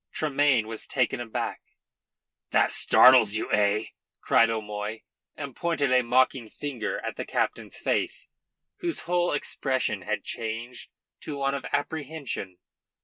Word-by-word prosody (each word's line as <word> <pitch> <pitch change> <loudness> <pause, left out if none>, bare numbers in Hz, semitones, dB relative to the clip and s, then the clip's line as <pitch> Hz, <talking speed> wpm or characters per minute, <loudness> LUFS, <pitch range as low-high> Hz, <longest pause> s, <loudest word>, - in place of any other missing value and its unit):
Tremayne 145 -6 +2
was 110 0 -5
taken 125 -1 0
aback. 120 -2 -4 0.9
"That - - +2
startles 125 -5 +6
you, 110 - -2
eh?" 105 +1 +2 0.3
cried 115 - +4
O'Moy, 105 0 -4 0.3
and 140 -4 -7
pointed 160 -6 0
a 130 0 +5
mocking 125 -1 +2
finger 135 -6 -4
at - - -4
the - - -3
captain's - - -2
face, - - -1 0.5
whose 345 -2 0
whole 175 +1 +1
expression 135 -2 -1
had 105 -2 -3
changed 115 +2 -5 0.3
to 145 - -6
one 140 0 0
of 140 -2 -4
apprehension. 145 - -4
125 Hz, 130 wpm, -26 LUFS, 110-145 Hz, 0.9 s, startles